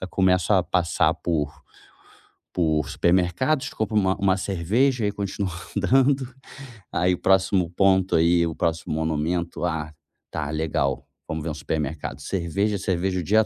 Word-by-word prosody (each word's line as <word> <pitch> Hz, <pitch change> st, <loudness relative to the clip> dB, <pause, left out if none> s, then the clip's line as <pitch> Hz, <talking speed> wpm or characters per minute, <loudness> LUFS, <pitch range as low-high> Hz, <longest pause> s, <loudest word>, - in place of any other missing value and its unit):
já 95 Hz, -, -4 dB
começo 95 Hz, 0 st, +2 dB
a 95 Hz, -2 st, +4 dB
passar 85 Hz, -3 st, +1 dB
por 80 Hz, -4 st, -1 dB, 1.0 s
por 80 Hz, -5 st, +1 dB
supermercados, 95 Hz, -, +1 dB
compra 110 Hz, 0 st, -2 dB
uma 95 Hz, -1 st, +2 dB
uma 95 Hz, -2 st, +2 dB
cerveja 105 Hz, +7 st, +1 dB
e -, -, +2 dB
aí 105 Hz, -, 0 dB
continua 100 Hz, -1 st, -3 dB, 0.2 s
andando. 130 Hz, +5 st, +2 dB, 0.6 s
Aí 90 Hz, +2 st, +2 dB
o 90 Hz, -, -2 dB
próximo 95 Hz, -2 st, +2 dB
ponto, 95 Hz, +1 st, +2 dB
aí 85 Hz, +1 st, +4 dB
o 80 Hz, -, -2 dB
próximo 80 Hz, -1 st, -2 dB
monumento, 80 Hz, +3 st, -2 dB
"Ah, 80 Hz, -2 st, -3 dB, 0.4 s
tá 75 Hz, -2 st, -4 dB
legal 75 Hz, -3 st, -1 dB, 0.2 s
vamos 80 Hz, -1 st, -4 dB
ver 80 Hz, -, -3 dB
um -, -, -3 dB
supermercado", 75 Hz, -1 st, -4 dB
cerveja, 100 Hz, +5 st, -1 dB
cerveja, 95 Hz, 0 st, -1 dB
o 90 Hz, -, -3 dB
dia 110 Hz, +5 st, +3 dB
90 Hz, 150 wpm, -24 LUFS, 80-100 Hz, 1.0 s, a